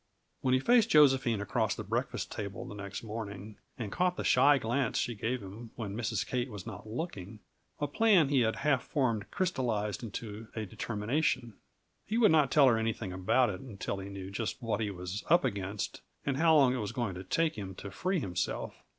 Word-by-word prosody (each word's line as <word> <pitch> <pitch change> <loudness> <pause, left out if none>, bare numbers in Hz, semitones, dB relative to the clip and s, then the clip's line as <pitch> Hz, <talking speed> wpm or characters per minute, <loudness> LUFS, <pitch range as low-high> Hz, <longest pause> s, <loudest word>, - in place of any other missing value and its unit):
When 130 -1 +2
he - - +3
faced 235 - +4
Josephine 130 - +5
across 105 - 0
the - - -5
breakfast - - -2
table 100 -2 -5
the - - -8
next 100 0 -6
morning, 105 -2 -6 0.2
and 110 -5 -4
caught 180 0 +1
the - - -2
shy 145 0 +5
glance 120 +1 0
she 120 - 0
gave 115 +2 -2
him 105 +5 -9
when 105 -4 -5
Mrs. 115 -2 -1
Kate 125 +1 -2
was 105 -5 -8
not 110 - -8
looking, 110 - -5 0.4
a 145 - +1
plan 180 -1 +4
he 140 -2 +3
had 110 -2 +2
half 140 -3 +2
formed 120 -9 -1
crystallized 120 - -1
into 110 -1 -6
a 110 -1 -2
determination. 115 +4 -1 0.5
He 220 - 0
would 225 -6 +6
not 150 -4 +4
tell 145 -2 +6
her 115 -3 +4
anything 110 -4 -2
about 105 +6 +2
it 90 - -7
until 100 -5 -5
he 95 +1 -7
knew 95 -1 -7
just 110 +2 -3
what 115 -3 -1
he 105 - 0
was 90 +1 -5
up 170 -2 +5
against, 100 -3 -3 0.2
and 135 -1 0
how 160 +1 +5
long 135 -4 +5
it - - -1
was 105 -2 -3
going 120 -6 -2
to 90 +1 -7
take 160 - +1
him 95 -3 -6
to 100 - -8
free 185 - -1
himself. 90 - -2
115 Hz, 200 wpm, -31 LUFS, 100-135 Hz, 0.5 s, would